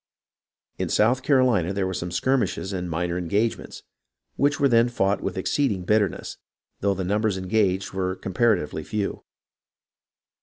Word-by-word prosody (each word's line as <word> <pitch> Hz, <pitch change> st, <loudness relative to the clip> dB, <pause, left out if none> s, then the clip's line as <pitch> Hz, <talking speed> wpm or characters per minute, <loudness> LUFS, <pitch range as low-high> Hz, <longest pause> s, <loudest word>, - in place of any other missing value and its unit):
In -, -, -1 dB
South 120 Hz, +5 st, +3 dB
Carolina 125 Hz, -, +2 dB
there 100 Hz, -1 st, -1 dB
were 95 Hz, -, -2 dB
some 85 Hz, 0 st, -4 dB
skirmishes 105 Hz, 0 st, 0 dB
and 90 Hz, -2 st, -3 dB
minor 85 Hz, +2 st, -2 dB
engagements, 100 Hz, +6 st, -2 dB, 0.5 s
which 145 Hz, 0 st, +1 dB
were 140 Hz, -, +4 dB
then 120 Hz, -1 st, +4 dB
fought 100 Hz, -4 st, 0 dB
with -, -, -4 dB
exceed 135 Hz, +7 st, +1 dB
ing 95 Hz, -3 st, -3 dB
bitterness, 105 Hz, -1 st, 0 dB, 0.4 s
though 100 Hz, 0 st, +1 dB
the 95 Hz, -, -3 dB
numbers 105 Hz, +1 st, 0 dB
engaged 95 Hz, -1 st, 0 dB
were 95 Hz, -1 st, -1 dB
com 95 Hz, -, -7 dB
paratively 90 Hz, -9 st, +1 dB
few. 105 Hz, +4 st, -3 dB
100 Hz, 150 wpm, -24 LUFS, 90-115 Hz, 0.5 s, were